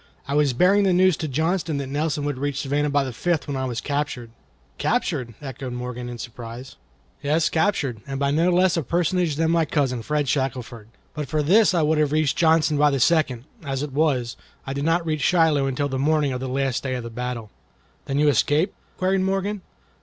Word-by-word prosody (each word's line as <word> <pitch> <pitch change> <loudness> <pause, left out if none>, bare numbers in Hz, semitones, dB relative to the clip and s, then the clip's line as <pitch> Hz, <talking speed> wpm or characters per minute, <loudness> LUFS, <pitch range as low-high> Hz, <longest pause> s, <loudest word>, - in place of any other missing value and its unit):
I 140 - -2
was 145 -3 +3
bearing 185 +10 +4
the 195 -2 +3
news 185 -1 +4
to 155 - -3
Johnston 160 +2 -1
that 140 - -3
Nelson 145 +2 -2
would 145 -3 -2
reach 140 0 -2
Savannah 145 +2 0
by 145 0 +2
the 130 -2 -5
fifth 170 +5 -1
when 140 - -3
I 130 0 -2
was 120 -2 -3
captured." 140 -5 -3 0.5
"Captured?" 120 -3 -1
echoed 130 -2 -6
Morgan, 125 0 -5
in 120 - -6
surprise. 120 +2 -8 0.5
"Yes, 155 +3 +1
captured, 155 - 0
and 135 -1 -4
by 140 0 +1
no 165 +4 +2
less 180 0 +3
a 165 - +1
personage 170 +1 0
than 160 +2 +1
my 165 -1 +3
cousin 135 -5 0
Fred 150 +3 -1
Shackelford. 125 -4 -2 0.3
But 150 -2 -4
for 155 +1 0
this 190 +5 +4
I 165 - +3
would 155 +1 +2
have 150 -1 +1
reached 155 -3 +2
Johnston 160 -2 +3
by 150 0 +5
the 140 -1 0
second; 135 -5 +2 0.2
as 135 -1 -3
it 145 -3 -6
was, 135 -6 0 0.3
I 135 - -4
did 140 +1 -3
not 165 +1 +2
reach 155 -2 -1
Shiloh 160 -3 +3
until 135 +2 -1
the 135 -1 -3
morning 150 -1 +2
of 125 - -3
the 130 0 -4
last 135 -1 -1
day 130 -1 -2
of 125 - -4
the 115 - -7
battle." 120 -2 -5 0.5
"Then 140 - -2
you 150 +1 +3
escaped?" 150 - +2 0.2
queried 185 +1 +1
Morgan. 195 +1 -1
145 Hz, 215 wpm, -23 LUFS, 130-160 Hz, 0.5 s, by